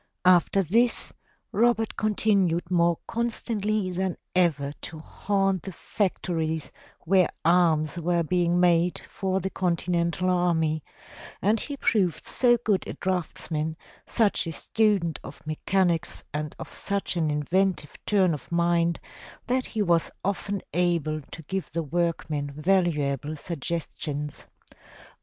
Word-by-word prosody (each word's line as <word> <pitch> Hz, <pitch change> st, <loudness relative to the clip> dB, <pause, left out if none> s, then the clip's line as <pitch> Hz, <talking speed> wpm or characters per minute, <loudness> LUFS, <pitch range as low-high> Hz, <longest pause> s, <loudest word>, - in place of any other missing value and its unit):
After 185 Hz, +2 st, +5 dB
this 230 Hz, +8 st, +3 dB, 0.4 s
Robert 225 Hz, 0 st, +2 dB
continued 195 Hz, -5 st, +1 dB
more 170 Hz, -1 st, +3 dB
constantly 215 Hz, -4 st, -1 dB
than 185 Hz, 0 st, -2 dB, 0.2 s
ever 145 Hz, -6 st, +2 dB
to 160 Hz, -, -7 dB
haunt 195 Hz, +3 st, 0 dB
the 190 Hz, -, -7 dB
factories 165 Hz, -5 st, -2 dB, 0.3 s
where 185 Hz, +1 st, +3 dB, 0.2 s
arms 165 Hz, -2 st, +3 dB
were 170 Hz, 0 st, +1 dB
being 175 Hz, +1 st, +1 dB
made 175 Hz, 0 st, +3 dB
for 190 Hz, 0 st, -1 dB
the 190 Hz, +1 st, -3 dB
Con 180 Hz, -2 st, +1 dB
tinental 170 Hz, +1 st, -1 dB
army, 165 Hz, -4 st, +1 dB, 0.6 s
and 215 Hz, +4 st, +2 dB
he 285 Hz, +4 st, -5 dB
proved 195 Hz, -, +1 dB
so 240 Hz, -2 st, +3 dB
good 205 Hz, -3 st, +1 dB
a -, -, -4 dB
draughtsman, 160 Hz, -3 st, -2 dB, 0.3 s
such 215 Hz, -6 st, +1 dB
a -, -, -2 dB
student 200 Hz, -3 st, +1 dB
of 145 Hz, -, -11 dB
mechanics 170 Hz, +2 st, 0 dB
and 150 Hz, 0 st, -3 dB
of -, -, -8 dB
such 200 Hz, -2 st, -2 dB
an 160 Hz, -3 st, +1 dB
inventive 150 Hz, +2 st, 0 dB
turn 190 Hz, -5 st, +3 dB
of 135 Hz, -1 st, -8 dB
mind, 170 Hz, 0 st, +2 dB, 0.5 s
that 255 Hz, +1 st, 0 dB
he 215 Hz, -2 st, -1 dB
was 170 Hz, -3 st, +2 dB, 0.2 s
often 200 Hz, 0 st, -2 dB
able 170 Hz, -3 st, +1 dB
to 160 Hz, -, -9 dB
give 190 Hz, +5 st, -4 dB
the 165 Hz, 0 st, -1 dB
workmen 155 Hz, -2 st, -1 dB
valuable 150 Hz, -4 st, +1 dB
suggestions. 150 Hz, -2 st, -4 dB
175 Hz, 125 wpm, -26 LUFS, 160-195 Hz, 0.6 s, After